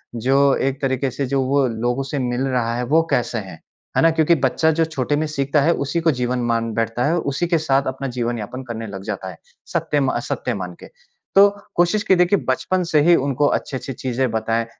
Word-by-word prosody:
जो 130 +4 +1 0.2
एक 135 0 -2
तरीके 135 0 0
से 135 +3 -2
जो 135 +1 0
वो 135 +1 +2
लोगों 120 +3 -1
से 135 +2 -4
मिल 125 -1 -1
रहा 120 -3 0
है 120 - -2
वो 155 +6 +4
कैसे 120 -1 0
हैं? 95 -6 -7 0.4
है - - +5
ना? 165 - +6
क्योंकि 160 +1 +3
बच्चा 145 +5 +2
जो 165 +1 +1
छोटे 145 -3 -1
में 155 +2 0
सीखता 140 0 0
है, 160 +4 +3
उसी 140 +3 -2
को 165 0 +3
जीवन 125 -2 -1
मान 115 0 0
बैठता 115 +2 -1
है, 160 +3 +2
उसी 150 +1 -1
के 170 -1 +2
साथ 140 -3 +1
अपना 135 +1 -3
जीवन 120 -1 -2
यापन 125 +5 -6
करने 115 -3 -6
लग 95 -1 -8
जाता 100 -3 -5
है, 90 - -10 0.4
सत्य 145 - 0
मा 135 -3 0
सत्य 125 - -2
मान 90 -4 -5
के। - - -11 0.5
तो 200 +1 +8 0.3
कोशिश 175 +5 +2
कि 190 - +4
देखिए 180 +2 +3
बचपन 180 +8 0
से 155 - +4
ही 170 +3 +5
उनको 140 0 +1
अच्छी-अच्छी 135 -1 -3
चीज़ें 130 +1 -1
बताएँ। 115 +1 0
130 Hz, 225 wpm, -21 LUFS, 120-150 Hz, 0.5 s, तो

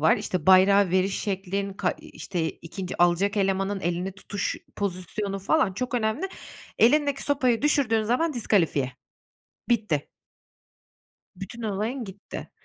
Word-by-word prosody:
var, 160 - +5
işte, 180 -3 -3
bayrağı 190 0 +6
veriş 190 +1 +1
şeklin, 195 0 -2
ka, - - 0
işte, 170 -4 -4
2. 180 +1 -4
alacak 190 +4 +2
elemanın 195 0 0
elini 175 +2 -2
tutuş 200 0 -3 0.2
pozisyonu 195 +1 -3
falan 200 +1 +2
çok 250 +5 -4
önemli. 225 - 0 0.5
Elindeki 285 +3 +4
sopayı 255 -4 +1
düşürdüğün 255 -7 +2
zaman 255 +9 +1
diskalifiye. 165 - +1 0.8
Bitti. 210 -11 +1 1.3
Bütün 205 +5 -8
olayın 220 +5 -2
gitti 195 0 -9
200 Hz, 120 wpm, -26 LUFS, 185-230 Hz, 1.3 s, bayrağı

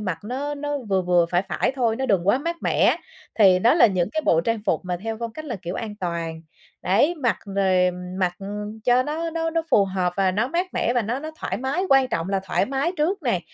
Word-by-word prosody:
mặc 185 -6 -3
nó 280 +5 -3
nó 290 0 -3
vừa 195 -6 -1
vừa, 175 -1 +3
phải 175 +1 +2
phải 200 - -1
thôi, 230 -4 +1
nó 265 - -2
đừng 195 -5 +1
quá 250 - +4
mát 335 +4 -3
mẻ, - - +3 0.4
thì 190 -4 +6
đó 235 +9 +4
là 320 - +7
những 185 -3 0
cái 315 - -1
bộ 165 - +4
trang 225 +5 -1
phục - - +1
mà 180 -1 -2
theo 225 0 -3
phong 230 -1 -4
cách 310 +6 -8
là, 250 -7 -4
kiểu, 175 +1 -4
an 215 -3 -5
toàn. 170 -2 -3 0.4
Đấy, 285 - +3
mặc 260 -8 0
rồi 190 -2 +2 0.3
mặc 180 -2 +1 0.5
cho 250 +1 +4
nó 320 +4 -3
nó 325 0 -2
nó 330 0 0
phù 200 - +5
hợp 185 -2 -1
và 195 -1 +3
nó 215 +6 0
mát 345 +6 0
mẻ 240 - +1
và 245 - +2
nó 230 +5 -2
nó 310 +3 -6
thoải - - -2
mái, 270 +8 -1
quan 270 -1 +4
trọng 165 -3 -2
là 195 -1 0
thoải 195 - 0
mái 275 +6 -1
trước 345 +5 0
nè, 235 -10 0
230 Hz, 245 wpm, -23 LUFS, 185-280 Hz, 0.5 s, là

